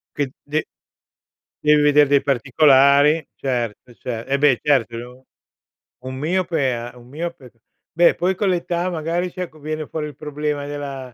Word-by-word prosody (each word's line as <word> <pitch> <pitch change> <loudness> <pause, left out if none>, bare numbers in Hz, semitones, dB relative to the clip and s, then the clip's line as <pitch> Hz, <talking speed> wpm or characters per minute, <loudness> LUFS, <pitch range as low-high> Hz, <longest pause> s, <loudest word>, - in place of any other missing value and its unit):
Che 145 -2 -1 0.2
de 150 +2 -1 1.0
devi 150 0 +5
vedere 145 0 +5
dei 140 0 +3
particolari. 140 +3 +4
Certo, 120 -2 -4
cer 115 0 -6
eh 140 - +3
beh, 140 -3 +3
certo 130 -5 +1
u 125 +2 -11 0.8
un 130 - -5
miope 160 -2 0
a 120 +1 -7
un 120 0 -16
miope 160 -3 -6 0.4
beh 170 +1 +4
poi 185 +2 0
con 200 +2 -1
l'età 175 -1 0
magari 170 +1 -2
si, 185 - -8
ecco 165 -3 -7
viene 155 +1 -4
fuori 150 0 -4
il 150 - -10
problema 150 0 -3
della 140 -3 -6
145 Hz, 155 wpm, -21 LUFS, 130-160 Hz, 1.0 s, devi